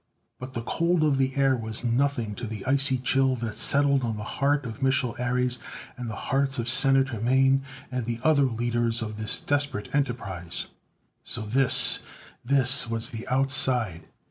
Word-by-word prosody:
But 130 +1 -8
the 120 -2 -4
cold 170 +5 0
of 145 -3 +2
the 130 0 0
air 135 -1 +3
was 110 -2 -4
nothing 120 -2 0
to 120 +3 -6
the 105 -3 -7
icy 135 0 +2
chill 130 +1 +1
that 115 -3 -5
settled 140 -1 +2
on 115 -3 -3
the 105 - -6
heart 140 +5 -1
of 115 +2 -7
Mich'l 130 -2 +1
Ares, 125 0 -1 0.4
and 125 -2 -6
the 110 - -5
hearts 135 +3 -1
of 120 -1 -3
Senator 135 -1 +2
Mane, 135 +3 +3 0.3
and 125 -3 -3
the 120 -1 -3
other 155 -2 +3
leaders 120 -1 -1
of 110 -1 -6
this 110 -1 +1
desperate 145 -7 -2
enterprise. 105 - -3 0.6
So 115 - -3
this, 120 +4 +2 0.4
this 135 -1 +5
was 115 -1 -3
the 115 -1 -8
Outside! 130 - +2
125 Hz, 170 wpm, -26 LUFS, 115-135 Hz, 0.6 s, this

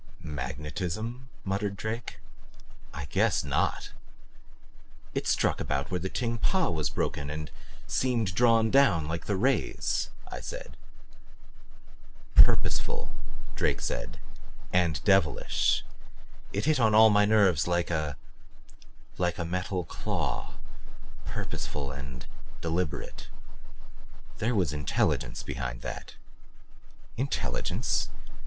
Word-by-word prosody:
"Magnetism?" 90 - -4
muttered 100 +1 -1
Drake. 110 +3 -4 0.7
"I 75 - -5
guess 70 - +2
NOT!" - - 0 1.2
"It - - -1
struck - - +2
about 70 +1 -1
where 90 - 0
the 95 +3 -3
Ting 115 0 -1
Pa 185 - +2
was 80 -3 0
broken 70 0 -2
and 75 +1 -5 0.3
seemed 115 -7 +1
drawn 115 +1 +4
down 105 - +5
like 80 +1 -3
the 100 - +1
rays," 130 +8 +1 0.2
I - - -6
said. - - -7 1.6
"Purposeful," - - +4 0.4
Drake - - +1
said. - - -3 0.6
"And 85 -6 +2
devilish. 95 - +3 0.7
It 100 - -1
hit 155 -2 +3
on 110 -3 +4
all 110 0 +9
my 105 0 +5
nerves 100 -8 +4
like 85 0 +1
a 75 -3 -1 1.0
like 90 -1 +1
a 85 - -2
metal 90 +2 -1
claw. - - -3 0.7
Purposeful 70 -2 -4
and 65 -2 -7 0.3
deliberate. 80 -6 -2 1.1
There 115 +2 +1
was 90 -7 +2
intelligence 75 -3 0
behind - - -4
that." - - -6 1.0
"Intelligence? 135 +3 0
90 Hz, 105 wpm, -29 LUFS, 75-110 Hz, 1.6 s, all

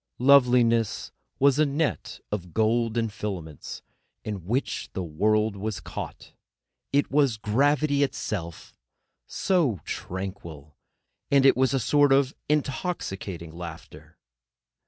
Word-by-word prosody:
Loveliness 125 -4 +4 0.3
was 140 +1 +4
a 155 - +5
net 145 +2 -2
of 90 -5 -5
golden 115 +1 +1
filaments 95 - -6 0.4
in 100 -5 -6
which 125 +6 -2
the 95 - -3
world 105 +6 +1
was 105 +1 -4
caught. - - -8 0.6
It 145 +1 +1
was 140 -5 +3
gravity 140 +7 +2
itself, 90 - -3 0.5
so 155 - +1
tranquil; 85 -6 -6 0.5
and 140 -1 +4
it 135 - +7
was 130 +1 +2
a - - +2
sort 145 +4 +3
of 135 0 +3 0.2
intoxicating 120 - -2
laughter. 85 -1 -10
115 Hz, 110 wpm, -26 LUFS, 95-140 Hz, 0.6 s, it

